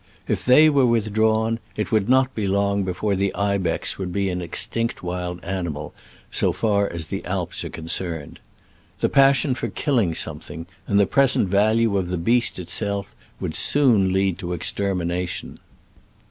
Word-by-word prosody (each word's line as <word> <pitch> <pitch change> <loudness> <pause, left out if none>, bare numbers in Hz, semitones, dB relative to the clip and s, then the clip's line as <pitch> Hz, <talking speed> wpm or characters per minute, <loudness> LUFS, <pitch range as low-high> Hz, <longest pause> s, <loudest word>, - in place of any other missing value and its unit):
If - - -1
they 140 +5 +6
were 140 -4 +3
withdrawn, 110 0 +1 0.2
it 105 - -3
would 110 -1 +1
not 130 0 +3
be 105 -3 -2
long 100 +1 +1
before 95 +3 -2
the 100 0 0
ibex 100 -2 -1
would 90 -2 -4
be 100 +1 -1
an 90 0 -3
extinct 115 +7 -2
wild 90 0 -4
animal, 85 -6 -4 0.4
so - - +1
far 100 -2 0
as 85 -1 -4
the - - -5
Alps - - -3
are - - -5
concerned. 80 -1 -3 0.6
The - - +1
passion 135 0 +4
for 125 - -3
killing 115 - 0
something, 80 +2 -1 0.2
and 100 - +2
the 100 - +5
present 135 -7 +3
value 110 +2 +2
of 90 - -3
the 90 0 -2
beast 120 +8 +1
itself, 100 +3 -2 0.3
would - - -4
soon 115 -10 +3
lead 95 -1 0
to 90 -2 -4
its 85 - -5
extermination. 90 -2 -2
100 Hz, 160 wpm, -22 LUFS, 90-115 Hz, 0.6 s, they